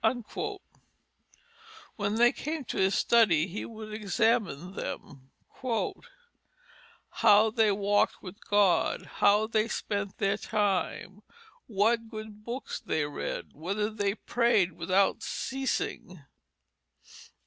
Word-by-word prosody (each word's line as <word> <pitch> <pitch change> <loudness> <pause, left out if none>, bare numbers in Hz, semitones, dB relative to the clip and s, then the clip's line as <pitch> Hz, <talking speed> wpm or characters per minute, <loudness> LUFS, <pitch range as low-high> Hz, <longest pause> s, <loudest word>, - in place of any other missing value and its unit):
When 205 0 -1
they 240 +1 +5
came 305 -1 -4
to - - -5
his 190 +1 +3
study, 200 -10 +4
he 195 +3 -5
would 215 -1 -9
examine 205 - 0
them, 135 -7 -7 1.8
"How 215 +2 +5
they 220 -2 +3
walked 205 +1 +1
with 185 +3 -11
God? 205 -3 +3 0.2
How 205 +2 +5
they 220 0 +1
spent 200 -3 -3
their 200 0 +1
time, 205 -2 -1 0.5
what 225 +2 +1
good 215 -1 -9
books 240 +4 -5
they 155 -2 -1
read? 145 - -5
Whether 200 +7 -2
they 205 -2 -1
prayed 235 -7 +2
without 185 +4 +1
ceasing?" 260 - -3
205 Hz, 105 wpm, -29 LUFS, 190-225 Hz, 1.8 s, they